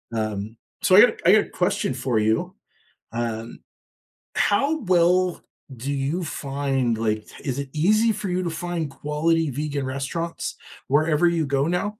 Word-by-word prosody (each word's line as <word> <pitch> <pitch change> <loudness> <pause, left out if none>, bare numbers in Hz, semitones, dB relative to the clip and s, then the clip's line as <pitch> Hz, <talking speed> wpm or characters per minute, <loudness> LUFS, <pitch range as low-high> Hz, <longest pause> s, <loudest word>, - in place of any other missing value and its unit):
Um, 110 0 -3 0.3
so 185 - +5
I 205 - +10
got 245 - +6
I 180 - +7
gotta 215 - +4
question 180 -7 0
for 125 -3 0
you. 110 +1 0 0.6
Um, 115 -1 -4 0.8
how 280 +10 +2
well 180 -1 +2 0.3
do 130 +4 -4
you 145 +6 -1
find 135 -5 -1
like, 110 -1 -1 0.2
is 135 0 -3
it 140 - -5
easy 215 +8 +3
for 200 -2 -4
you 180 +1 0
to 170 - -1
find 165 -1 -3
quality 155 +3 0
vegan 145 0 -3
restaurants 140 +6 -4 0.3
wherever 155 +4 +3
you 170 -3 +1
go 140 0 +1
now? 180 +3 0
150 Hz, 150 wpm, -24 LUFS, 130-175 Hz, 0.8 s, I